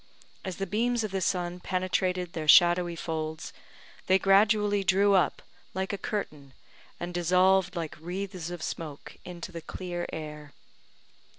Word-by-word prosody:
As 190 Hz, -3 st, -5 dB
the 195 Hz, -, -2 dB
beams 230 Hz, +4 st, 0 dB
of 215 Hz, -, -3 dB
the 190 Hz, -1 st, -2 dB
sun 180 Hz, -1 st, -1 dB
penetrated 185 Hz, -1 st, -1 dB
their 155 Hz, -2 st, -4 dB
shadowy 175 Hz, +1 st, +6 dB
folds, 160 Hz, -1 st, -4 dB, 0.5 s
they 190 Hz, -, +5 dB
gradually 205 Hz, +1 st, +3 dB
drew 195 Hz, +1 st, +4 dB
up 190 Hz, -, +2 dB, 0.3 s
like 190 Hz, +1 st, -2 dB
a -, -, -1 dB
curtain, 150 Hz, -10 st, -5 dB, 0.5 s
and 175 Hz, +1 st, -5 dB
dissolved 185 Hz, +2 st, +3 dB
like 165 Hz, -3 st, -5 dB
wreaths 180 Hz, 0 st, -5 dB
of 175 Hz, -3 st, -6 dB
smoke 150 Hz, -4 st, -6 dB
into 180 Hz, 0 st, -7 dB
the 165 Hz, -1 st, -7 dB
clear 175 Hz, 0 st, -5 dB
air. 150 Hz, -2 st, -7 dB
180 Hz, 140 wpm, -28 LUFS, 170-195 Hz, 0.5 s, shadowy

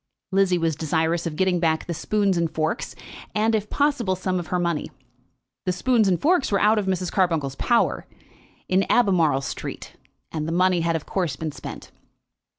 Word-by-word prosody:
Lizzie 190 Hz, -2 st, +3 dB
was 165 Hz, -2 st, 0 dB
desirous 160 Hz, +2 st, 0 dB
of 155 Hz, -, -5 dB
getting 185 Hz, 0 st, +1 dB
back 160 Hz, -2 st, +1 dB
the 175 Hz, -, -3 dB
spoons 200 Hz, +3 st, 0 dB
and 170 Hz, -1 st, +1 dB
forks, 160 Hz, +6 st, -2 dB, 0.4 s
and, 220 Hz, +2 st, +2 dB
if 215 Hz, -1 st, -1 dB
possible, 275 Hz, -10 st, +1 dB
some 185 Hz, 0 st, -1 dB
of 170 Hz, -, -6 dB
her 180 Hz, -, -1 dB
money. 170 Hz, -3 st, -1 dB, 0.8 s
The -, -, +3 dB
spoons 220 Hz, +4 st, +2 dB
and 180 Hz, -3 st, +2 dB
forks 330 Hz, -5 st, +2 dB
were 200 Hz, -, +3 dB
out 215 Hz, +1 st, +4 dB
of 200 Hz, -, -3 dB
Mrs. 185 Hz, -2 st, -1 dB
Carbuncle's 165 Hz, -8 st, +1 dB
power, 235 Hz, -, +1 dB, 0.6 s
in 185 Hz, +1 st, +3 dB
Albemarle 185 Hz, -, +3 dB
Street; 135 Hz, -, -6 dB, 0.4 s
and 155 Hz, -1 st, -3 dB
the -, -, -2 dB
money 180 Hz, 0 st, +3 dB
had 165 Hz, 0 st, +1 dB
of 160 Hz, -, -3 dB
course 180 Hz, -6 st, -1 dB
been 160 Hz, -1 st, -4 dB
spent. -, -, -9 dB
180 Hz, 180 wpm, -24 LUFS, 165-200 Hz, 0.8 s, out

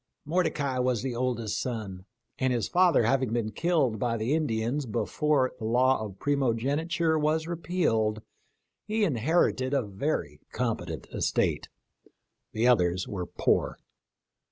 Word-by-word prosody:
Mordecai 150 Hz, -5 st, 0 dB
was 125 Hz, -2 st, 0 dB
the 130 Hz, -3 st, -3 dB
oldest 120 Hz, -4 st, -1 dB
son, 105 Hz, -7 st, -5 dB, 0.3 s
and 130 Hz, -1 st, +1 dB
his 120 Hz, -3 st, 0 dB
father 180 Hz, -7 st, +4 dB
having 130 Hz, 0 st, +1 dB
been 115 Hz, -2 st, -1 dB
killed 150 Hz, -, +1 dB
by 115 Hz, 0 st, 0 dB
the 115 Hz, +6 st, 0 dB
Indians 130 Hz, -2 st, -1 dB
before 135 Hz, +4 st, +1 dB
the -, -, -7 dB
law 125 Hz, +1 st, +3 dB
of 100 Hz, -3 st, -8 dB
primogeniture 145 Hz, -, 0 dB
was 155 Hz, +1 st, +1 dB
repealed, 155 Hz, -11 st, 0 dB, 0.6 s
he 215 Hz, 0 st, 0 dB
inherited 140 Hz, -, +1 dB
a 135 Hz, -, +2 dB
very 95 Hz, -, -3 dB
competent -, -, -3 dB
estate. -, -, 0 dB, 0.8 s
The 115 Hz, +3 st, +1 dB
others 90 Hz, -6 st, +2 dB
were 90 Hz, -4 st, -4 dB
poor. -, -, 0 dB
130 Hz, 130 wpm, -28 LUFS, 110-150 Hz, 0.8 s, father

